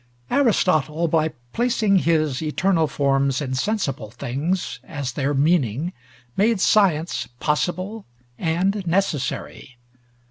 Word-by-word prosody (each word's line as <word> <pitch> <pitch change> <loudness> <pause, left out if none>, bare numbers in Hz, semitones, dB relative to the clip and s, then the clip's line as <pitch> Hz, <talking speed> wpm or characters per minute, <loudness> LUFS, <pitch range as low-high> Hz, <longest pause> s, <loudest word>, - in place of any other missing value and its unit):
Aristotle, 170 - +2
by 160 -1 +2 0.3
placing 225 -5 +2
his 155 -6 +1
eternal 165 +1 +1
forms 140 -1 +1
in 135 -3 -3
sensible 135 - -1
things 140 - -3
as 140 -2 -4
their 140 +3 -1
meaning, 150 - +1 0.4
made 220 +1 +2
science 180 -5 +2
possible 185 +8 -1 0.3
and 185 +4 0
necessary. 165 -7 -2
160 Hz, 100 wpm, -22 LUFS, 140-190 Hz, 0.4 s, Aristotle